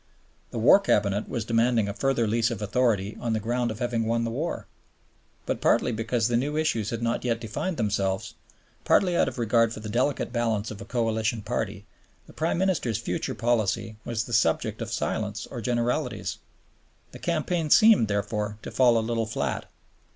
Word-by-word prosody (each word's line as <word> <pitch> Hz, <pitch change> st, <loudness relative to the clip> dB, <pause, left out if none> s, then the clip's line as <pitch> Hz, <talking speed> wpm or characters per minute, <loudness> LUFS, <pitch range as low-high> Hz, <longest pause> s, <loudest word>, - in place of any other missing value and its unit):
The -, -, -6 dB
War 115 Hz, -, +7 dB
Cabinet 105 Hz, -, +1 dB
was 115 Hz, -4 st, -3 dB
demanding 115 Hz, -1 st, +2 dB
a 100 Hz, -, -3 dB
further 135 Hz, -1 st, +1 dB
lease 115 Hz, +2 st, +2 dB
of 115 Hz, -, -4 dB
authority 105 Hz, -2 st, 0 dB
on 115 Hz, -2 st, -1 dB
the 110 Hz, -, 0 dB
ground 120 Hz, +3 st, -1 dB
of 110 Hz, -, -5 dB
having 120 Hz, -1 st, -1 dB
won 115 Hz, 0 st, +1 dB
the 115 Hz, -, -2 dB
war. 150 Hz, +8 st, -3 dB, 0.8 s
But -, -, -2 dB
partly -, -, +3 dB
because 115 Hz, 0 st, 0 dB
the 120 Hz, -, 0 dB
new 145 Hz, +5 st, 0 dB
issues 115 Hz, -9 st, 0 dB
had 115 Hz, 0 st, -3 dB
not 115 Hz, 0 st, 0 dB
yet 115 Hz, -2 st, 0 dB
defined 120 Hz, -, -3 dB
themselves, 100 Hz, -3 st, -1 dB, 0.5 s
partly 180 Hz, -2 st, +3 dB
out -, -, +3 dB
of 130 Hz, -, -5 dB
regard 115 Hz, -1 st, +2 dB
for 115 Hz, -, -6 dB
the 110 Hz, 0 st, -7 dB
delicate 125 Hz, +2 st, 0 dB
balance 115 Hz, -3 st, 0 dB
of 100 Hz, -, -8 dB
a -, -, -7 dB
Coalition 110 Hz, -2 st, -1 dB
Party, 105 Hz, -3 st, -3 dB, 0.4 s
the -, -, -16 dB
Prime 160 Hz, +2 st, -1 dB
Minister's 175 Hz, -, 0 dB
future 115 Hz, -, -3 dB
policy 115 Hz, -2 st, 0 dB
was 115 Hz, -2 st, -2 dB
the 120 Hz, -, -8 dB
subject 110 Hz, -, +1 dB
of -, -, -4 dB
silence 105 Hz, -1 st, -2 dB
or 120 Hz, -, -5 dB
generalities. 120 Hz, +4 st, -1 dB, 0.7 s
The -, -, -11 dB
campaign 170 Hz, -1 st, -1 dB
seemed, 215 Hz, -, +6 dB
therefore, 105 Hz, 0 st, -2 dB
to -, -, -6 dB
fall 125 Hz, -3 st, +4 dB
a 110 Hz, -, 0 dB
little 115 Hz, -1 st, -1 dB
flat. 75 Hz, -, -3 dB
115 Hz, 185 wpm, -26 LUFS, 110-125 Hz, 0.8 s, War